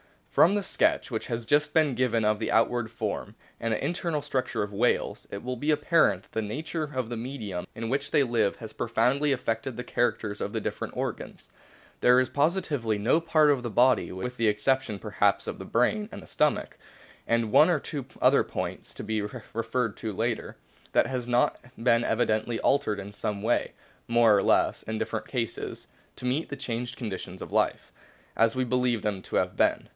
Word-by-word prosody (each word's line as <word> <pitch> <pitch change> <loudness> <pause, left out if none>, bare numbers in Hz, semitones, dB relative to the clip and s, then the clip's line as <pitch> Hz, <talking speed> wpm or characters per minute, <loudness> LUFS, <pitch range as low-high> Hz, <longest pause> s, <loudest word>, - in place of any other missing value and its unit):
o - - -34
From 185 +5 +5
the 205 - 0
sketch 185 - +1
which 110 - -3
has 115 -1 -3
just 145 +6 +2
been 155 -4 +4
given 120 -2 +1
of 105 0 +2
the 110 - -2
outward 115 0 +2
form 115 - -4 0.2
and 115 0 -1
the 110 - -2
internal 170 -1 -1
structure 135 -6 -1
of 105 - -5
whales, 115 +5 0
it 100 - -6
will 125 +1 -3
be 145 +6 -2
apparent 150 - +3
that - - -25
the 110 - -1
nature 155 +9 -3
of 130 -3 -2
the 120 - -4
medium 110 -7 -5
in 115 0 -4
which 140 +2 -1
they 145 - +4
live 115 -5 +1
has 110 -2 -9
profoundly 135 +5 +1
affected 120 -1 -2
the 125 - -5
characters 110 -4 -1
of - - -3
the - - -1
different - - -4
organs. - - -5 0.5
There 125 +1 +6
is 130 - +1
positively 145 - 0
no 115 +10 +3
part 155 -2 +4
of 135 -3 +1
the 120 - -3
body, 125 +4 +3
with 125 +7 -5
the 115 - +2
exception 105 +1 +1
perhaps 100 -1 +1
of - - -5
the - - -7
brain 205 - +1
and - - -8
the - - -15
stomach, 150 -1 0 0.5
and 115 -2 +1
one 155 +9 +7
or 160 -5 +2
two 140 -4 -5 0.2
other - - +5
points - - -5
to - - -6
be 110 -1 -1
referred 115 +1 -3
to 110 -2 -4
later, 115 +3 -2 0.4
that - - +4
has 125 -2 -3
not 120 0 +2 0.2
been 115 0 +3
evidently 110 0 +1
altered 135 -8 +2
in 100 +1 -7
some 105 0 -4
way, 120 +2 +1 0.3
more 115 -2 +5
or 100 - +3
less, - - +2
in 110 0 -4
different 110 0 -3
cases, 120 -4 -4 0.3
to - - -8
meet 135 +6 0
the 140 - -4
changed 120 -1 -4
conditions 95 -6 -6
of - - -7
life - - 0 0.5
as 115 +1 +3
we 130 - +1
believe 125 -2 +1
them 100 -3 -1
to - - -15
CLA - - +3
SSIFICA 90 0 -5
TION - - -17
97 - - +7
have - - -4
been. - - -21
120 Hz, 210 wpm, -27 LUFS, 110-135 Hz, 0.5 s, one